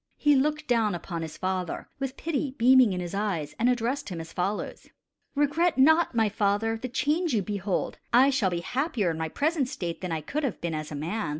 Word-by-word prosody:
He 295 Hz, -1 st, +4 dB
looked 300 Hz, +3 st, 0 dB
down 225 Hz, -6 st, +2 dB
upon 170 Hz, -1 st, -5 dB
his 160 Hz, -1 st, -6 dB
father 185 Hz, -2 st, -3 dB
with 270 Hz, -1 st, -4 dB
pity 290 Hz, -4 st, -2 dB
beaming 250 Hz, -1 st, +6 dB
in 180 Hz, -, -2 dB
his 175 Hz, 0 st, -5 dB
eyes, 185 Hz, -8 st, -2 dB
and 235 Hz, +2 st, +3 dB
addressed 245 Hz, +2 st, -1 dB
him 175 Hz, -3 st, -5 dB
as 165 Hz, 0 st, -8 dB
follows: 195 Hz, +3 st, -3 dB, 0.5 s
"Regret 305 Hz, +4 st, +2 dB
not, 315 Hz, +1 st, +4 dB
my 225 Hz, -2 st, +3 dB
father, 210 Hz, +2 st, 0 dB
the 255 Hz, +3 st, -5 dB
change 300 Hz, +3 st, 0 dB
you 205 Hz, -, +1 dB
behold. 200 Hz, -1 st, -2 dB
I 260 Hz, +4 st, +6 dB
shall 230 Hz, -8 st, +2 dB
be 175 Hz, -1 st, -2 dB
happier 245 Hz, -, -1 dB
in 160 Hz, -, -5 dB
my 160 Hz, 0 st, -2 dB
present 295 Hz, -, 0 dB
state 170 Hz, -7 st, -5 dB
than 180 Hz, -2 st, -4 dB
I 160 Hz, -1 st, -2 dB
could 300 Hz, -, -3 dB
have 260 Hz, -7 st, -2 dB
been 170 Hz, -1 st, -3 dB
as 155 Hz, 0 st, -4 dB
a -, -, -4 dB
man. 170 Hz, +7 st, -3 dB
220 Hz, 215 wpm, -27 LUFS, 180-275 Hz, 0.5 s, beaming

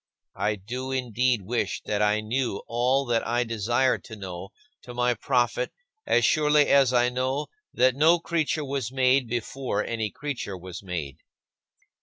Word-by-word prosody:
I 105 Hz, 0 st, +1 dB
do 125 Hz, +7 st, -6 dB
indeed 125 Hz, -3 st, 0 dB
wish 115 Hz, +5 st, -2 dB
that 105 Hz, 0 st, -1 dB
I 105 Hz, 0 st, +2 dB
knew 115 Hz, 0 st, -2 dB
all 125 Hz, +4 st, +1 dB
that 120 Hz, -2 st, +1 dB
I 120 Hz, +1 st, +1 dB
desire 120 Hz, +3 st, +1 dB
to 110 Hz, -, -11 dB
know 95 Hz, -2 st, -7 dB, 0.3 s
to 125 Hz, -, -10 dB
my 125 Hz, 0 st, +2 dB
profit 125 Hz, +1 st, 0 dB, 0.4 s
as 120 Hz, -, +4 dB
surely 150 Hz, 0 st, +4 dB
as 135 Hz, -3 st, +5 dB
I 125 Hz, -1 st, +3 dB
know 130 Hz, +4 st, -1 dB, 0.3 s
that 130 Hz, +1 st, +4 dB
no 160 Hz, +5 st, +5 dB
creature 160 Hz, -2 st, -1 dB
was 135 Hz, -4 st, -3 dB
made 130 Hz, -1 st, +3 dB
before 120 Hz, -1 st, -2 dB
any 110 Hz, -2 st, -2 dB
creature 130 Hz, -10 st, -5 dB
was 90 Hz, 0 st, -8 dB
made. 85 Hz, -8 st, -5 dB
120 Hz, 155 wpm, -26 LUFS, 110-130 Hz, 0.4 s, as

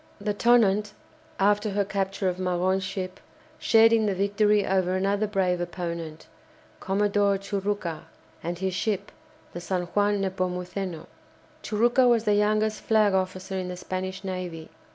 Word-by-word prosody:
The 205 Hz, +1 st, -1 dB
"Tonnant," 210 Hz, -2 st, +3 dB, 0.5 s
after 205 Hz, +2 st, +2 dB
her 200 Hz, 0 st, 0 dB
capture 195 Hz, 0 st, -2 dB
of 180 Hz, 0 st, -2 dB
Magon's 185 Hz, +1 st, 0 dB
ship, 185 Hz, -1 st, -5 dB, 0.4 s
shared 225 Hz, 0 st, +5 dB
in 220 Hz, -2 st, +3 dB
the 200 Hz, -, 0 dB
victory 205 Hz, +1 st, +2 dB
over 185 Hz, -1 st, +1 dB
another 200 Hz, +3 st, 0 dB
brave 185 Hz, -3 st, 0 dB
opponent, 170 Hz, -3 st, -5 dB, 0.5 s
Commodore 200 Hz, 0 st, +1 dB
Churucca, 195 Hz, -4 st, -3 dB, 0.4 s
and 170 Hz, +1 st, -4 dB
his 190 Hz, +1 st, -2 dB
ship, 200 Hz, +1 st, -2 dB, 0.4 s
the 175 Hz, -, -6 dB
"San 180 Hz, +1 st, -2 dB
Juan 205 Hz, 0 st, +2 dB
Nepomuceno." 185 Hz, -1 st, -3 dB, 0.6 s
Churucca 240 Hz, +4 st, +3 dB
was 235 Hz, -2 st, +3 dB
the 210 Hz, -, +2 dB
youngest 215 Hz, +1 st, +1 dB
flag 215 Hz, -3 st, +3 dB
officer 190 Hz, 0 st, -2 dB
in 185 Hz, -, -4 dB
the 180 Hz, 0 st, -6 dB
Spanish 185 Hz, +1 st, -5 dB
navy. 180 Hz, -4 st, -5 dB
195 Hz, 140 wpm, -26 LUFS, 185-205 Hz, 0.6 s, shared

